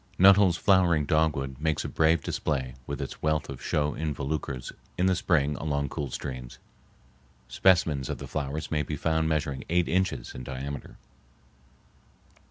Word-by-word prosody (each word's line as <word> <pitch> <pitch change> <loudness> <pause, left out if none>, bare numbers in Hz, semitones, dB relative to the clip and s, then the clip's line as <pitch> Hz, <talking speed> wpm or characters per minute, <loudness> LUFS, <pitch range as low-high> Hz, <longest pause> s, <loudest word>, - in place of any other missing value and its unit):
Nuttall's 95 -2 +6
flowering 90 -6 +3
dogwood 75 -4 +1
makes 80 0 0
a - - -1
brave 80 -1 +2
display 65 -5 -2
with 70 0 -3
its 70 - -8
wealth 80 0 0
of 65 -2 -7
show 75 -1 0
involucres 70 -4 -3 0.3
in 90 - +2
the 95 0 +3
spring 75 -5 +1
along 70 -2 -1
cool 70 -2 -4
streams. 65 -1 -6 0.9
Specimens 75 -1 +2
of - - -3
the - - -7
flowers 75 +1 -4
may 75 -2 +1
be 75 - -3
found 80 +2 0
measuring 75 -3 -1
eight 85 +1 +2
inches 90 -9 -1
in 65 - -7
diameter. 70 +2 -6
75 Hz, 150 wpm, -27 LUFS, 70-80 Hz, 0.9 s, Nuttall's